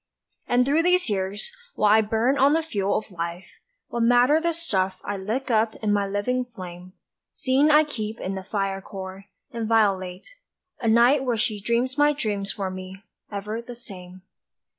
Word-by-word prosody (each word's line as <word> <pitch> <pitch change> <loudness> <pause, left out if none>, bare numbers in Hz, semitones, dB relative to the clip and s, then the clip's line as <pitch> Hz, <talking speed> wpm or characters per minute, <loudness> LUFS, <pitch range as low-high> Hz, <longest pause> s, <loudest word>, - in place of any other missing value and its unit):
And 245 +1 +3
through 290 +4 +3
these 360 -6 +2
years, 195 +1 -2 0.2
while 210 -1 +3
I 220 - +6
burn 225 +5 +1
on 280 +1 +4
the 325 +1 +2
fuel 200 -10 0
of 215 - -6
life, 170 +1 -5 0.4
What 235 - -3
matter 245 +6 +4
the 340 0 +1
stuff 195 - 0
I 205 - -3
lick 225 +7 -3
up 220 0 +2
in 210 -2 -1
my 200 -1 +1
living 205 +6 -1
flame, 185 -6 -10 0.4
Seeing 275 +2 +2
I 305 0 +6
keep 225 -7 -5
in 190 - -3
the 190 - -4
fire 195 -1 -2
core, 190 0 -8 0.3
inviolate, 215 - 0 0.4
A 230 - -2
night 240 +5 +5
where 245 -3 0
she 215 -1 0
dreams 240 +6 0
my 295 0 +5
dreams 210 -8 -2
for 190 -2 -4
me, 185 +1 -9 0.3
ever 210 +3 -4
the 240 +1 -9
same. 185 -5 -10
215 Hz, 175 wpm, -24 LUFS, 195-250 Hz, 0.4 s, I